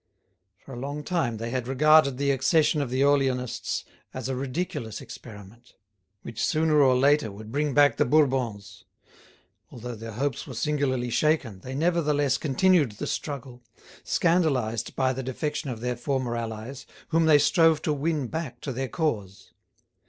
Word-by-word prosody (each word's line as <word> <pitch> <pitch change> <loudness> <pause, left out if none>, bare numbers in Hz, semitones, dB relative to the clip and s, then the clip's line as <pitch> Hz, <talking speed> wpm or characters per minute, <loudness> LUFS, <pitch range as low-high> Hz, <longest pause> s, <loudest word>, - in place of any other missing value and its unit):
For 135 - -10
a 120 - -7
long 145 +3 -5
time 145 -10 -1
they 115 +2 -5
had 125 -1 -2
regarded 140 0 +4
the 140 0 +1
accession 150 +3 +2
of 140 - -3
the 130 +2 -1
Orleanists 135 -3 0 0.3
as 130 -1 -4
a 135 - -2
ridiculous 135 - -4
experiment, 110 +2 -12 0.5
which 115 - -5
sooner 155 -1 +3
or 130 -2 +5
later 140 -2 +3
would 105 +2 -10
bring 145 +1 -1
back 145 -4 +5
the - - +3
Bourbons; 125 -7 0 0.8
although 120 +1 -7
their 115 0 -8
hopes 135 +5 -3
were 130 - -8
singularly 130 -3 -1
shaken, 135 -7 +1
they 130 +6 -7
nevertheless 150 -4 +1
continued 155 - +2
the 105 - -6
struggle, 130 -4 -5 0.4
scandalised 135 -11 0
by 130 -1 +1
the 130 - -4
defection 150 +3 -3
of 115 -3 -6
their 125 0 -2
former 125 -1 -2
allies, 115 +3 -6 0.2
whom 165 0 +2
they 155 -2 +7
strove 165 +1 +4
to 155 - +1
win 150 0 -1
back 130 -3 -5
to 135 - -4
their 130 +1 -3
cause. 105 - -3
135 Hz, 160 wpm, -26 LUFS, 120-150 Hz, 0.8 s, they